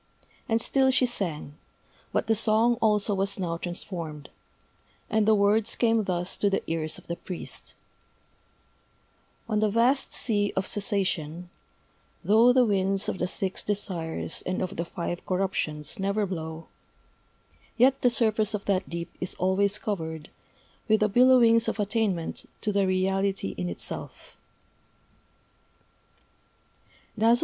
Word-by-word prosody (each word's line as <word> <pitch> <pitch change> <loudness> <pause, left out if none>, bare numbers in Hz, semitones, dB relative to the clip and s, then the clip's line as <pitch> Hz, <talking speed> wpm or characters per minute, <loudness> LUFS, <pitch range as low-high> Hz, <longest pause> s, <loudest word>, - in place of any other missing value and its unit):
And 225 0 +2
still 265 +3 +3
she 260 0 +3
sang 165 - -3 0.5
but - - 0
the 225 - +2
song 225 +2 +3
also 210 -1 +2
was 195 0 +2
now 170 -3 -2
transformed; 170 -4 -6 0.8
and 215 0 +2
the 220 - +6
words 205 +1 +2
came 225 -3 +2
thus 180 -1 -2
to 205 - +2
the 195 - -1
ears 160 -1 -2
of - - -15
the 170 - -5
priest: 180 -3 -6 1.7
_On 215 -2 0
the 215 - +3
Vast 240 +6 +2
Sea 205 -3 +1
of 190 - 0
Cessation, 180 -5 -2 0.7
Though 225 +4 +5
the 250 0 +4
Winds 195 -1 +1
of 190 - -3
the 180 - 0
Six 190 0 -3
Desires 175 -6 -3
and 185 0 -2
of 185 - -5
the 170 - -3
Five 175 +1 -5
Corruptions 180 -6 -2
never 200 +2 0
blow, 160 -3 -6 1.1
Yet 265 +3 +4
the 245 - +5
surface 220 -3 +1
of 200 - -6
that 195 -1 0
deep 170 0 -5
is 180 - -3
always 195 +2 +2
covered 160 -8 -5 0.6
With 220 -1 +3
the 210 - +3
billowings 235 0 +5
of - - -2
Attainment 205 -5 -1
to 210 - 0
the 200 -1 +2
Reality 190 - 0
in 90 - -3
Itself. 85 - -7
195 Hz, 135 wpm, -27 LUFS, 175-220 Hz, 1.7 s, the